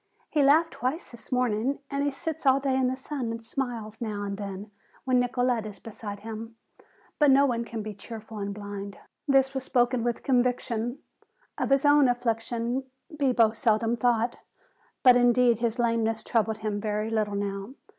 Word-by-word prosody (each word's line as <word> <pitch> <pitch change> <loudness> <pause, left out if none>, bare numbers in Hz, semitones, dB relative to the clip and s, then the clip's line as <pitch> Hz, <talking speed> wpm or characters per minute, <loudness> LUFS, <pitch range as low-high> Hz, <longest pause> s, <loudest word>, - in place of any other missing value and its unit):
"He 300 - +2
laughed 310 +4 +4
twice 265 +8 -3
this 235 0 -12
morning 250 +1 +1
and 280 0 0
he 285 - +2
sits 320 +1 -4
all 265 +1 +6
day 270 -1 0
in 260 -1 +2
the 255 - -1
sun 265 -2 -4
and 230 0 -5
smiles 230 -3 -4
now 210 -3 -3
and 200 0 -3
then 200 +1 -7 0.3
when 255 -1 +3
Nicolete 245 -2 0
is 205 - -9
beside 205 -2 -8
him. 225 +1 -7 0.6
But 295 -2 +5
no 275 +1 +6
one 235 -3 -1
can 225 -2 -5
be 215 0 -5
cheerful 220 +1 -9
and 200 0 -3
blind." 200 -1 -7 0.3
This 270 -1 +4
was 265 -1 -3
spoken 245 -1 +1
with 240 -1 -2
conviction. 245 -1 0 0.6
Of - - -2
his 275 +1 +3
own 290 -1 +6
affliction 240 +1 -1 0.3
Bibo 250 -6 +3
seldom 225 -1 +1
thought, 235 -1 +1 0.7
but 250 -1 +8
indeed 245 -1 +4
his 235 0 0
lameness 225 -2 +1
troubled 220 -2 0
him 210 -1 -3
very 215 +1 -2
little 215 -2 0
now. 200 +4 -4
235 Hz, 175 wpm, -27 LUFS, 215-260 Hz, 0.7 s, but